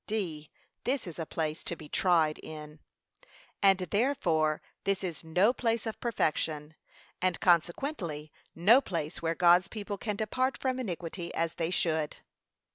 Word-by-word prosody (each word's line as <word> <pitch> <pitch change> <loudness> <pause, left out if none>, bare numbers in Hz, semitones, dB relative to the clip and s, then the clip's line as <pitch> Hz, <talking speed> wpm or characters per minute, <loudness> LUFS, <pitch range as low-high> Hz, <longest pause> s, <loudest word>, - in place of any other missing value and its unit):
(d.) 170 -9 -3 0.3
This 270 +2 0
is 170 -2 -8
a 160 - -3
place 155 -1 -2
to 170 - -3
be 155 - -11
tried 160 -3 +2
in. 150 -1 -9 0.8
And 195 -1 +6
therefore 180 - +1 0.2
this 195 -1 0
is 175 -3 -4
no 180 +8 +3
place 230 -3 0
of 225 - -4
perfection, 155 -8 -1 0.5
and 185 -2 +1
consequently 170 - +1 0.2
no 215 +11 +6
place 165 - -4
where 165 0 0
God's 175 +1 +5
people 205 -2 -5
can 210 -3 -2
depart 255 +6 0
from 260 -1 -1
iniquity 175 -5 -4
as 165 0 0
they 165 -1 -2
should. 160 -4 0
175 Hz, 145 wpm, -30 LUFS, 160-210 Hz, 0.8 s, And